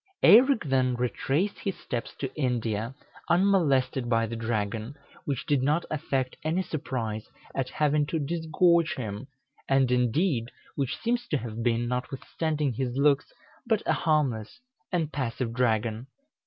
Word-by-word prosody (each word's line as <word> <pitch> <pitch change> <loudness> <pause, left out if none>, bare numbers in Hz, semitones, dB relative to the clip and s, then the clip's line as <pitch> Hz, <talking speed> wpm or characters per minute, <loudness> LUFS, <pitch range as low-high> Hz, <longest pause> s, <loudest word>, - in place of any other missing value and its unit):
Eirek 250 +1 +7
then 130 -2 +2
retraced 135 - -1
his 195 - -3
steps 120 -2 -5
to 135 - -5
India, 120 -3 -1 0.3
unmolested 140 -10 +3
by 115 -1 +3
the 115 +1 -5
dragon, 110 +2 -2 0.3
which 140 -3 -2
did 145 -3 +2
not 150 +5 +1
affect 135 -4 -1
any 165 +4 0
surprise 120 -9 -4 0.2
at 135 -1 -2
having 150 -1 +1
to 165 - -1
disgorge 165 +2 +2
him, 110 0 -5 0.4
and, 135 -2 +3
indeed, 125 - +1 0.3
which 140 +2 -1
seems 235 +8 -1
to 150 - +1
have 115 -2 -5
been, 120 0 +1
notwithstanding 140 +3 -2
his 125 +1 -2
looks, 140 0 +3 0.4
but 220 -3 +2
a - - +2
harmless 145 - 0 0.3
and 165 -5 -1
passive 125 -3 -2
dragon. 115 -1 0
135 Hz, 140 wpm, -27 LUFS, 120-155 Hz, 0.4 s, Eirek